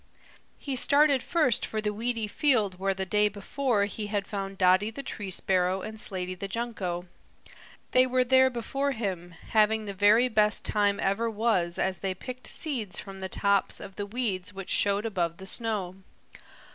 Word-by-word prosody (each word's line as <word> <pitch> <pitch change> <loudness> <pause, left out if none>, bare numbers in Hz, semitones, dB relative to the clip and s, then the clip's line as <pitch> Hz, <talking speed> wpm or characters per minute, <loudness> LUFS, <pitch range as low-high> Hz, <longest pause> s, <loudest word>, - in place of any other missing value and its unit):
He 275 -2 -4
started 280 +1 +4
first 305 -8 +1
for 220 - -2
the 210 -1 -1
weedy 225 0 -1
field 215 - +1
where 195 0 0
the 190 0 -3
day 210 +3 +3
before 210 +2 0
he 210 +1 -5
had 205 -1 -2
found 195 -1 -5
Dotty 185 +3 +4
the 275 +5 -7
Tree 205 -6 -6
Sparrow 185 0 +1
and 220 0 -6
Slaty 185 -3 -2
the 190 +2 -5
Junco. 195 -6 -3 0.9
They 255 0 +5
were 255 0 +2
there 260 +1 +5
before 270 +3 -2
him, 180 -6 -4
having 220 0 +3
the 200 - -4
very 210 +5 +5
best 215 -2 +1
time 205 -1 +2
ever 210 +4 0
was 210 -6 0
as 190 0 0
they 190 -1 -2
picked 255 +6 -6
seeds 235 - -2
from 195 -1 -9
the 190 0 -4
tops 200 0 +1
of 195 -1 -10
the 205 0 -4
weeds 205 -5 -2
which 195 -1 -6
showed 205 +1 +2
above 175 -6 -1
the 190 - -10
snow. 200 -4 -2
205 Hz, 175 wpm, -28 LUFS, 190-235 Hz, 0.9 s, They